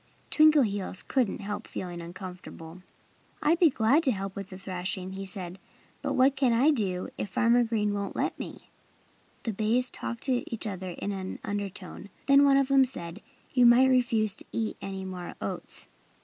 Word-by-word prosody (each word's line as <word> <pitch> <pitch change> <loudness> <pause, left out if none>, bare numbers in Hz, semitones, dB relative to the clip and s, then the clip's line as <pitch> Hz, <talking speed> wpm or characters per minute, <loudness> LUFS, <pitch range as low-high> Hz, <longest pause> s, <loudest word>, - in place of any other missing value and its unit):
Twinkleheels 255 -13 +3
couldn't 250 -7 0
help 205 +2 -5
feeling 175 -2 -6
uncomfortable. 180 -1 -9 0.6
"I'd 320 +3 +3
be 340 - +7
glad 255 +4 +3
to 265 - +4
help 195 -2 -4
with 195 -1 -6
the 185 - -9
thrashing," 185 0 -3
he 195 0 -6
said. 185 -1 -6 0.4
"But - - -1
what 265 +2 +4
can 265 -3 +2
I 265 +7 +5
do 190 -9 -1
if 200 - -3
Farmer 235 +5 +3
Green 215 -3 0
won't 200 -1 -3
let - - -1
me?" - - -8 0.7
The 225 - -2
bays 230 +5 +1
talked 235 -1 -5
to 255 -3 +1
each 230 -1 -2
other 190 -3 -4
in 205 - -3
an 190 -1 -5
undertone. 200 -1 -4 0.2
Then 280 0 +6
one 275 -1 +5
of 275 -1 +2
them 275 -1 +6
said: 195 -7 -5 0.3
"You 250 -2 +6
might 250 +2 +6
refuse 235 -5 +2
to - - -8
eat 225 -1 -2
any 190 -1 -5
more 180 -2 -6
oats." - - -4
210 Hz, 175 wpm, -28 LUFS, 190-255 Hz, 0.7 s, be